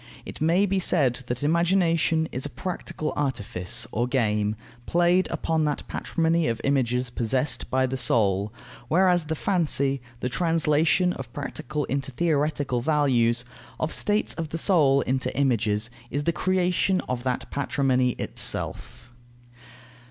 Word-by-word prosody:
It - - -9
may 170 +5 +3
be 195 -1 0
said 135 -9 +2
that 125 +3 -3
imagination 165 0 +2
is 130 - -4
a 145 - -2
practical 155 +2 -4
artifice 110 -10 -1
or 120 +3 0
game, 105 -5 0 0.3
played 175 +2 +3
upon 160 -1 -1
that 150 -1 -3
patrimony 165 -1 0
of 115 -1 -1
images 125 -2 0
possessed 125 +4 -1
by 130 0 +2
the 130 +1 -3
soul; 105 -4 +1 0.4
whereas 175 +2 +3
the 160 +1 -2
fancy, 145 -7 0 0.2
the 125 - -2
translation 165 +4 +2
of 125 -3 -8
practical 145 0 -4
into 135 0 -2
theoretical 145 -3 0
values, 125 -5 +2 0.3
of 155 - -1
states 210 +1 +1
of 165 -2 -5
the 165 - -4
soul 150 -7 +3
into 130 +1 -1
images, 115 -4 +1 0.2
is 145 +1 -2
the 170 - +1
creation 185 +1 +1
of 125 -1 -4
that 125 -1 -3
patrimony 130 -3 +1
itself. 120 - -2
140 Hz, 135 wpm, -25 LUFS, 125-165 Hz, 0.4 s, may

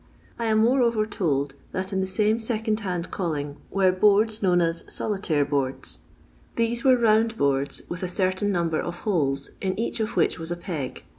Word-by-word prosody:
I 230 - -1
am 220 -1 +2
moreover 235 -1 +3
told 145 -10 -1 0.2
that 190 +2 -3
in 190 - +1
the 190 - -1
same 210 +4 +1
second 220 -1 -1
hand 180 -5 -3
calling 150 -5 -3
were 190 -2 +3
boards 210 +3 +3
known 180 -3 +3
as 165 -1 +1
" - - -15
solitaire 185 -9 0
boords." 135 - -1 0.6
These 235 +2 0
were 260 -2 +6
round 225 -1 +3
boards, 140 0 0
with 180 - -6
a 185 - -1
certain 185 +2 0
number 170 -4 0
of 175 0 -6
holes, 140 -9 0
in 190 0 -2
each 230 - -2
of 220 0 -2
which 165 - +2
was 165 0 -6
a 175 - -3
peg. 165 -8 -5
190 Hz, 190 wpm, -25 LUFS, 165-220 Hz, 0.6 s, were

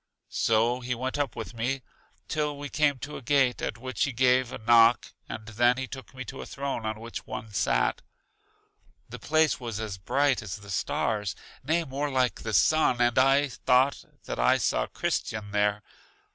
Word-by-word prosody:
So 115 +3 +2
he 125 0 -3
went 130 +4 -3
up 140 -4 -1
with 115 - -6
me 125 +3 -2 0.4
till 150 -1 -1
we 145 0 -6
came 145 -2 +2
to 145 +4 -7
a - - -9
gate, 135 -2 +2
at 110 - -3
which 130 +2 -1
he 140 - -2
gave 125 0 +3
a - - -5
knock 115 +1 +4 0.2
and 110 -1 -6
then 120 +3 +3
he 130 - -2
took 130 0 -10
me 130 0 -6
to - - -7
a - - -7
throne 135 -5 -4
on 110 0 -3
which 115 +1 -7
one 110 -1 -7
sat. - - +1 1.1
The - - -8
place 155 0 +2
was 115 -4 -5
as 105 -4 -5
bright 140 +7 +1
as 95 -3 -5
the 100 -1 -11
stars, 105 +2 -1 0.3
nay 160 +5 +1
more 145 0 -3
like 130 -2 0
the 110 - -4
sun. 130 +4 +3
And 120 +1 +3
I 135 +2 +4
thought 130 +2 +2 0.2
that - - -5
I - - +4
saw - - 0
Christian 105 -2 -3
there. 105 0 +1
125 Hz, 185 wpm, -27 LUFS, 110-135 Hz, 1.1 s, knock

